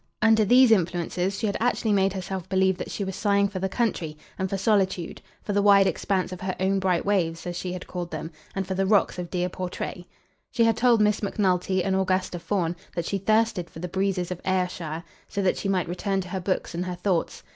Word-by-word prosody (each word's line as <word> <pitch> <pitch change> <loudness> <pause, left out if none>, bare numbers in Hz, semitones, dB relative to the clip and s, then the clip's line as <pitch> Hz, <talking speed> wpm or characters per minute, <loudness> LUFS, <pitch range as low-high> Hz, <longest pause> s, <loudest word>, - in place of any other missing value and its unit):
Under 220 0 +5
these 245 +3 +6
influences 180 0 +1
she - - -2
had 200 - -1
actually 230 -2 +1
made 195 -1 +3
herself 190 -1 -5
believe 190 0 +2
that - - -5
she 205 - -3
was 190 -1 -4
sighing 200 -1 +2
for 195 -1 -5
the 190 +1 -1
country, 185 -8 -1 0.2
and 190 0 -1
for 195 - -1
solitude; 190 -4 0 0.2
for 205 - -2
the 205 - +3
wide 200 -1 +6
expanse 190 -1 0
of 185 - -7
her 185 -1 -2
own 195 +1 +2
bright 185 -2 +1
waves, 170 -5 0
as 175 0 -4
she 180 0 -4
had 185 - -6
called 175 -1 -5
them, 160 +1 -5 0.2
and 195 0 -1
for 190 - -3
the 190 +1 0
rocks 200 -3 +3
of 175 -1 -5
dear 180 -1 -1
Portray. 180 0 -5 0.4
She 235 -1 +2
had 225 -1 +4
told 235 -3 +4
Miss 210 0 +2
Macnulty 190 -2 +1
and 190 -1 0
Augusta 185 -1 0
Fawn 175 -2 -1 0.2
that 170 -1 -2
she 195 - -1
thirsted 215 -3 +1
for - - -13
the 175 +2 -4
breezes 190 -1 -1
of 180 - -5
Ayrshire, 180 -4 -2 0.2
so 200 - -2
that 185 - +2
she 195 - -2
might 185 -3 +1
return 195 +3 -1
to 185 - -9
her 190 0 -3
books 185 0 -2
and 175 +2 -2
her 180 - -3
thoughts. 180 -2 -1
190 Hz, 230 wpm, -25 LUFS, 180-200 Hz, 0.4 s, these